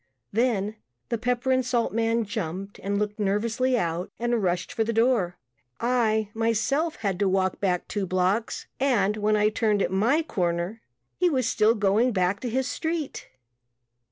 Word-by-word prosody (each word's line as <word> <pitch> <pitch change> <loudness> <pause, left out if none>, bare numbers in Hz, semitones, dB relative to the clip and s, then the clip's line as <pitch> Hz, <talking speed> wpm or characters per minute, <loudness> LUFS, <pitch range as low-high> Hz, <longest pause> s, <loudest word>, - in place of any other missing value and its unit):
Then 215 -2 0 0.3
the 235 - 0
pepper 245 +2 0
and 260 0 +3
salt 240 -3 0
man 230 +1 +1
jumped 195 -1 -5
and 200 +1 -1
looked 210 +1 -2
nervously 225 +5 +1
out 170 -3 -2
and 240 -1 0
rushed 180 -1 -1
for 225 - +1
the 225 - -1
door. 225 -6 +2 0.4
I, 220 -3 +1
myself, 230 +8 0
had 195 -4 -2
to 200 -2 +2
walk 190 0 +1
back 180 -3 0
two 200 -2 -2
blocks 185 +5 0
and 220 -7 +2
when 215 0 +1
I 210 0 +3
turned 210 -2 +1
at - - -1
my 235 +12 +2
corner 175 - -2 0.4
he 360 -1 +3
was 260 -6 +1
still 220 +1 +3
going 215 +4 +2
back 185 +1 +1
to 250 - -3
his 260 +2 0
street. 320 -1 -3
215 Hz, 165 wpm, -26 LUFS, 195-240 Hz, 0.4 s, and